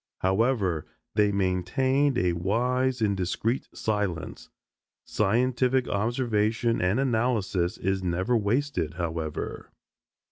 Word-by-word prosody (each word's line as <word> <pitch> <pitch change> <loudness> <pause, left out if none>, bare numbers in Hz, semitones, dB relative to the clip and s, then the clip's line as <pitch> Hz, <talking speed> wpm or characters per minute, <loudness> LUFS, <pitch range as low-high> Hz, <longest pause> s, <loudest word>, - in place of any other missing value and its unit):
However, 95 - +1 0.3
they 105 -1 +3
maintained 125 +9 +1
a 90 -6 +2
wise 125 +8 0
and 100 -2 +2
discreet 100 +7 -1
silence. 105 -6 -3 0.6
Scientific 125 +4 +1
observation 115 +1 0
and 90 +6 +2
analysis 110 -8 0
is 95 0 -1
never 95 +7 0
wasted, 110 - 0
however. 80 -3 -4
105 Hz, 95 wpm, -27 LUFS, 95-125 Hz, 0.6 s, they